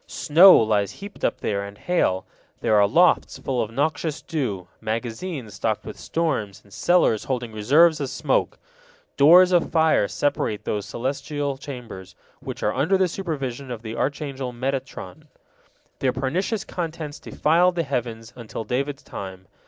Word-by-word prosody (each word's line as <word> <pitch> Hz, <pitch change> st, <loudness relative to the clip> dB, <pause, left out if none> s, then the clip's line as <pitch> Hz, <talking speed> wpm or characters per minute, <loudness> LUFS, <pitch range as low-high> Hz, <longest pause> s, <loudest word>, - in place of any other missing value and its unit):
Snow 175 Hz, +6 st, +7 dB
lies 105 Hz, -3 st, +1 dB
heaped 200 Hz, +1 st, -11 dB
up -, -, 0 dB
there 100 Hz, -1 st, -1 dB
and 100 Hz, 0 st, -9 dB
hail; 100 Hz, -, 0 dB, 0.4 s
there -, -, +1 dB
are 100 Hz, -1 st, +5 dB
lofts 175 Hz, -, +3 dB
full 130 Hz, -2 st, -2 dB
of 110 Hz, -, -2 dB
noxious 150 Hz, +4 st, -1 dB
dew, 105 Hz, -, -3 dB
magazines 115 Hz, -, -4 dB
stocked 110 Hz, +1 st, -2 dB
with 110 Hz, -, -7 dB
storms, 140 Hz, -, -2 dB
and 100 Hz, -, -19 dB
cellars 175 Hz, -, +2 dB
holding 125 Hz, -3 st, -3 dB
reserves 150 Hz, +10 st, +4 dB
of 140 Hz, -3 st, -2 dB
smoke. -, -, 0 dB, 0.6 s
Doors 180 Hz, +6 st, +7 dB
of 175 Hz, -2 st, +3 dB
fire 160 Hz, -10 st, +3 dB
separate 125 Hz, -7 st, -1 dB
these 105 Hz, -1 st, -2 dB
celestial 140 Hz, +3 st, -3 dB
chambers, 125 Hz, -9 st, -9 dB, 0.2 s
which -, -, -7 dB
are -, -, +1 dB
under 185 Hz, +7 st, +2 dB
the 190 Hz, -1 st, +3 dB
supervision 140 Hz, -8 st, -4 dB
of 120 Hz, -2 st, -6 dB
the 110 Hz, 0 st, -6 dB
archangel 140 Hz, -2 st, -3 dB
Metatron. 135 Hz, +4 st, -5 dB, 0.7 s
Their 130 Hz, -2 st, +1 dB
pernicious 180 Hz, -, -1 dB
contents 160 Hz, -4 st, -5 dB
defiled 175 Hz, +3 st, +2 dB
the 170 Hz, -, 0 dB
heavens 120 Hz, -5 st, -4 dB
until 115 Hz, -2 st, -6 dB
David's 140 Hz, +4 st, -3 dB
time. 95 Hz, -1 st, -8 dB
135 Hz, 150 wpm, -23 LUFS, 110-160 Hz, 0.7 s, Snow